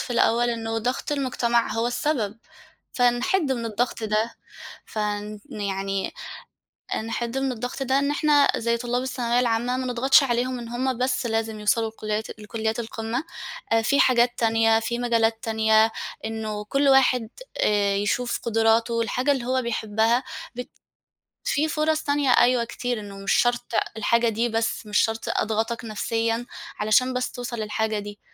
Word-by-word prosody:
في 245 - -4
الأول، 240 +1 +3
إنه 225 -1 -2
ضغْط 250 +5 -2
المجتمَع 240 -4 0
هو 230 +1 0
السبب، 240 -5 -1 0.5
فنحِد 265 +6 +2
من 235 -2 -3
الضغط 230 +1 -2
ده. 215 +2 0 0.5
فن 210 0 -3
يعني، 195 -1 -2 0.9
نحِد 235 +2 -3
من 270 -1 0
الضغط 245 +3 -5
ده 265 +1 +2
إن 280 0 +1
إحنا، 295 -1 +4
زي 235 0 0
طُلّاب 245 +1 -2
الثانوية 245 -2 0
العامة، 240 +1 +1
ما 255 0 -3
نضغَطش 255 +4 +5
عليهم 250 0 0
إن 235 -1 -7
هُم 250 +1 -2
بس 255 0 0
لازم 225 -1 -2
يوصَلوا 220 +1 +1
لكُلّيات 215 0 -4
لكُلّيات 220 +2 -2
القمّة. 225 +3 -3 0.5
آآ، 225 0 +4
في 280 +4 +3
حاجات 240 -1 +3
تانية، 225 -1 +3
في 235 +2 -2
مجالات 230 -2 +1
تانية، 220 0 +3 0.3
إنّه 220 -1 -4
كلّ 275 +6 +1
واحد 255 -4 +4 0.3
آآ 205 -1 +2
يشوف 225 +4 -1
قدراته، 225 +1 +2
الحاجة 255 +5 +1
اللي 265 -4 -2
هو 260 0 +1
بيحبّها، 225 +1 +1 0.3
بت 250 +1 -6 0.8
في 315 -11 +1
فُرص 310 0 0
تانية 285 -1 +1
أيوه 245 0 +4
كتير، 245 0 -3
إن 200 -1 -9
مش 200 - +2
شرْط 240 0 +1 0.2
الحاجة 235 +2 +2
دي 230 +2 0
بس، 225 0 -1
مش 210 -1 -1
شرْط 225 0 0
أضغطَك 225 +2 -1
نفسيًا 225 +2 -1 0.3
علشان 215 +5 +3
بس 250 0 -2
توصَل 245 -1 -5
للحاجة 215 0 -1
دي. 205 0 -8
235 Hz, 150 wpm, -24 LUFS, 220-250 Hz, 0.9 s, نضغَطش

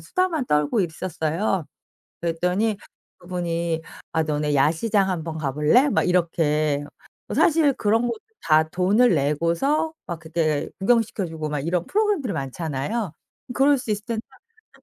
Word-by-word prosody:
수다만 355 -7 -1
떨고 150 +6 +2
있었어요. 170 +1 -1 0.5
그랬더니 180 +6 0 0.4
그분이 170 -2 -2 0.3
"아 160 - +2
너네 150 -1 -1
야시장 190 +8 +2
한번 165 -3 -3
가 140 -4 -2
볼래?" 150 - +4
막 - - +2
이렇게. 155 -5 +1 0.4
뭐 - - -5
사실 315 -3 +4
그런 225 -1 +2
것도 235 -2 -2 0.2
다 155 0 +3
돈을 195 +7 +3
내고서 170 - +1
막 170 -2 -5
그때 160 -2 -1
구경시켜 220 -1 +1
주고 160 -2 -4
막 150 -1 -2
이런 170 +4 -1
프로그램들이 400 - 0
많잖아요. 155 - -3 0.4
그럴 275 +2 +4
수 240 - -5
있을 210 0 -2
텐데 230 -1 -2 0.5
그냥 - - -23
175 Hz, 305 characters per minute, -23 LUFS, 155-225 Hz, 0.5 s, 볼래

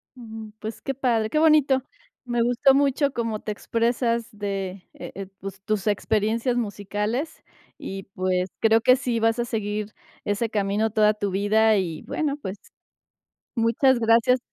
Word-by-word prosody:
Ujú. 220 -3 -9
Pues, 220 +1 -6
qué 270 - -3
padre, 235 -5 0
¡qué 305 - +1
bonito! 290 -4 +4 0.4
Me 240 -1 0
gustó 245 +3 +4
mucho 280 0 +2
cómo 230 -3 -2
te 215 - -5
expresas 235 +1 0
de, 195 -3 -5
eh, 195 0 -8
pues, 195 0 -8
tus 215 0 -2
experiencias 220 +4 +1
musicales. 210 - -3 0.3
Y, 195 0 -6
pues, 185 0 0
creo 225 0 +4
que 255 +1 +6
sí 245 -3 -1
vas 225 +1 +2
a 240 - 0
seguir 210 -2 -3 0.3
ese 205 +2 -1
camino 210 +1 0
toda 215 0 +3
tu 205 -2 -3
vida, 215 +2 +3
y, 165 -5 -2
bueno, 295 -3 -2
pues 195 -7 -6 1.0
muchas 235 +3 +3
gracias 230 +3 +4
220 Hz, 150 wpm, -24 LUFS, 205-245 Hz, 1.0 s, que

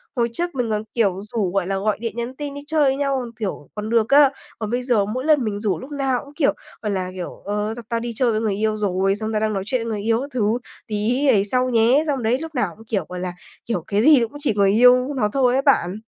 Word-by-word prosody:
Hồi 235 -1 +1
trước 345 0 -3
mình 245 -3 -1
còn, 215 0 -1
kiểu, 195 -5 +2
rủ, 210 -3 -2
gọi 190 -2 0
là, 195 0 -1
gọi 210 +1 0
điện, 230 -1 -4
nhắn 240 +2 -4
tin, 290 -1 -5
đi 285 - -7
chơi 310 -1 +1
với 270 -1 +3
nhau, 275 -1 0
còn 240 -2 -6
kiểu, 190 -8 -4
còn 215 +1 -4
được 230 -1 +2
á. 280 -1 +7 0.3
Còn 215 - -3
bây 245 +1 -1
giờ 230 -6 +2
mỗi 255 +6 -4
lần 300 -5 +4
mình 205 -2 -2
rủ, 205 -3 -1
lúc 265 +3 -10
nào 270 -3 0
cũng, 285 - -15
kiểu, 290 -2 +2 0.3
gọi 210 - -2
là, 185 -2 -2
kiểu: 180 - -7
“Ờ, 210 +2 -2
tao 235 - -7
tao 230 0 0
đi 235 0 -4
chơi 245 -2 +2
với 215 - 0
người 210 -3 0
yêu 215 +1 0
rồi”, 195 -1 +1
xong 215 +1 -4
“tao 215 - 0
đang 215 -1 0
nói 195 -1 -2
chuyện 250 0 -1
với 230 - -4
người 210 -2 -3
yêu 225 +3 +1
các 280 - -6
thứ, 225 -1 +1 0.3
tí 230 +7 0
ấy 205 -6 +4
sau 255 +4 +1
nhé.” 240 +5 +4
Xong 270 -5 -1
đấy, 235 +3 +2
lúc 320 -2 -8
nào 200 -9 0
cũng, 225 - -15
kiểu, 215 -3 -2
gọi 180 - -5
là, 180 -1 -4 0.3
kiểu, 190 -8 -2
cái 205 +1 +1
gì 300 0 +7
nó 230 - 0
cũng 290 - -11
chỉ 285 -6 0
người 200 -1 +4
yêu 250 +5 +5
nó 210 -5 +1
thôi 255 -3 +3
ấy 270 - +2
bạn. 210 -8 +2
230 Hz, 290 wpm, -22 LUFS, 210-260 Hz, 0.3 s, á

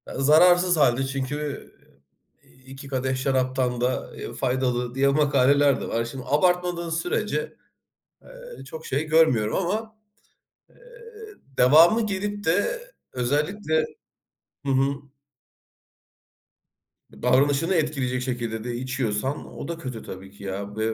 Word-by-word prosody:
Zararsız 175 +5 +5
hâlde 135 -2 +3
çünkü; 140 +2 -4 0.7
iii, 130 - -24
2 135 +1 -10
kadeh 130 -1 -1
şaraptan 130 -2 0
da 125 +1 -1 0.3
faydalı 125 -1 -1
diye, 140 +1 +3
makaleler 140 -1 +3
de - - -4
var. 115 0 -1
Şimdi 125 +2 -7
abartmadığın 175 +2 +1
sürece, 165 0 -2 0.7
eee, - - -12
çok 480 -1 -9
şey 310 - -1
görmüyorum 155 -9 +3
ama, 215 +4 -2 0.7
eee, - - -25 0.8
devamı 165 - +6
gelip 205 +1 -3
de, 205 - +1 0.3
özellikle 155 +6 0 0.8
Hı 135 - 0
hı. 135 +1 +2 2.2
Davranışını 140 - +2
etkileyecek 135 -6 -1
şekilde 120 -3 -3
de 120 0 -4
içiyorsan, 130 +1 -2
o - - -6
da 170 - -4
kötü 130 -8 -7
tabii 95 +1 -9
ki, 100 - -14
ya 100 +1 -5
ve 110 +1 -1
135 Hz, 115 wpm, -24 LUFS, 125-165 Hz, 2.2 s, devamı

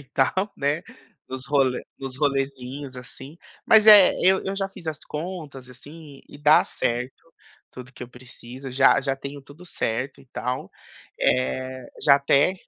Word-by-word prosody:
e 140 - -15
tal, 185 +9 +1
né, 145 +4 -1 0.5
nos 130 +1 -7
role 135 -3 +1 0.2
nos 135 -1 -7
rolezinhos, 135 -1 -2
assim, 135 +4 -11 0.3
mas, 220 -1 +6
eh, 205 -3 +9
eu 190 +1 +4
eu 195 +1 -3
já 195 -1 -2
fiz 185 -4 -13
as 155 -1 -5
contas, 150 -5 -7
assim, 145 +3 -13
e - - -12
dá 150 +1 +5
certo 125 +2 -3 0.6
tudo 125 0 -11
que - - -11
eu 125 - -8
preciso, 125 +1 -11
já 135 +2 +4
já 135 0 -1
tenho 140 +1 -8
tudo 145 +6 -15
certo 130 -3 -3
e 135 - -19
tal, 125 +1 -4 0.5
eh, 130 0 -1 0.2
já 140 - +6
até, 140 +5 +2
140 Hz, 160 wpm, -24 LUFS, 130-155 Hz, 0.6 s, eh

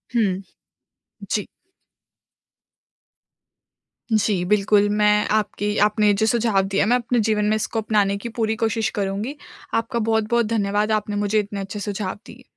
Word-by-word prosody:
हुँ। 195 -5 +1 0.9
जी। 210 - 0 2.7
जी, 210 -4 +2
बिल्कुल 205 +1 +3
मैं 210 0 +3
आपकी 210 0 -2
आपने 210 -1 +2
जो - - +4
सुझाव 225 -3 +2
दिया 195 0 +1
है 205 - 0
मैं 245 - +5
अपने 245 0 -1
जीवन 210 -1 +1
में 215 - +2
इसको 220 +1 -2
अपनाने 205 -2 +1
की 235 +4 -6
पूरी 220 -1 +1
कोशिश 225 -1 0
करूँगी। 205 +7 -3 0.4
आपका 230 +1 -1
बहुत-बहुत 225 +1 +1
धन्यवाद, 210 -1 0
आपने 210 -1 -1
मुझे 205 +1 +1
इतने 205 -1 -4
अच्छे 195 +2 -5
सुझाव 200 -2 -4
दिए। - - -13
210 Hz, 145 wpm, -22 LUFS, 205-220 Hz, 2.7 s, मैं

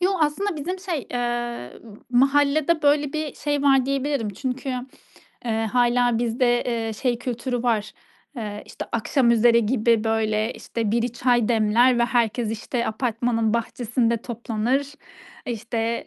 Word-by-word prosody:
Yo, 365 +2 +3
aslında 320 +5 0
bizim 360 +6 -4
şey, 355 -7 -4
eee, 240 - -3 0.4
mahallede 290 +5 +3
böyle 290 -1 +3
bir 310 -2 -3
şey 290 -1 -2
var 270 -2 +4
diyebilirim. 275 -4 -1
Çünkü, 255 +5 -4 0.8
eee, 225 -1 0
hâlâ 245 -1 +3
bizde, 240 +1 +1
eee, 230 -2 -2
şey 240 +2 -1
kültürü 245 0 -3
var: 220 -3 0 0.4
Eee, 210 -3 -5
işte, - - -7
akşamüzeri 235 -1 +3
gibi 230 -1 +2
böyle 220 0 0
işte, 225 -3 -3
biri 235 +1 0
çay 245 -2 +2
demler 235 +2 +4
ve 235 - +4
herkes, 235 -2 0
işte, 235 +2 -3
apartmanın 230 -1 0
bahçesinde 235 0 0
toplanır, 240 +4 -2 0.5
işte, 230 0 -2
240 Hz, 130 wpm, -23 LUFS, 225-270 Hz, 0.8 s, var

